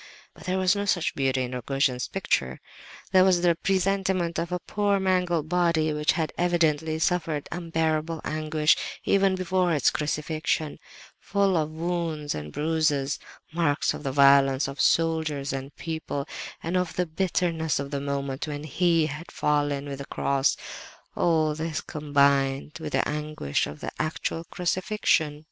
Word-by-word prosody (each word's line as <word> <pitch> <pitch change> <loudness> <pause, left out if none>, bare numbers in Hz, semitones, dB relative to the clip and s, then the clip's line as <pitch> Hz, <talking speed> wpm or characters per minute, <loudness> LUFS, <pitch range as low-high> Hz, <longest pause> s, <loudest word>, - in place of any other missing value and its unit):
But - - -14
there 185 0 0
was 185 +1 +3
no 200 0 -1
such 175 -4 +1
beauty 135 -1 0
in 125 - -4
Rogojin's 125 0 0
picture. 65 -1 -1 0.5
This 185 -1 +6
was 185 -2 +4
the 175 -1 +5
presentment 190 -1 0
of 170 +1 -3
a 180 - 0
poor 200 +2 0
mangled 180 -4 +1
body 165 -3 +2
which 150 0 +2
had 160 -2 -2
evidently 160 -3 +1
suffered 160 -3 0
unbearable 160 -1 -1
anguish 155 0 +2 0.3
even 195 -1 +3
before 185 -1 +1
its 145 - +3
crucifixion, 155 0 -2 0.4
full 200 -2 +1
of 155 -2 +1
wounds 160 -2 -2
and 75 0 -6
bruises, 150 - 0 0.3
marks 160 -4 +1
of - - -7
the 140 -2 -2
violence 140 0 +5
of 140 0 -4
soldiers 160 -4 +1
and 135 +1 -6
people, 160 -3 -4 0.4
and 170 +3 -2
of 180 -2 -1
the 180 - +1
bitterness 165 -2 0
of 140 0 -4
the 140 -1 -2
moment 140 0 -3
when 145 -1 -5
He 165 +2 +2
had 155 +2 -6
fallen 145 -1 0
with 140 -1 -6
the 140 - -6
cross—all 155 +3 -1
this 155 0 -3
combined 140 -1 +1
with 155 -2 -5
the - - +2
anguish 150 - -2
of 75 +1 -9
the - - -4
actual 160 +1 -2
crucifixion. 180 -4 0
155 Hz, 150 wpm, -26 LUFS, 145-175 Hz, 0.5 s, This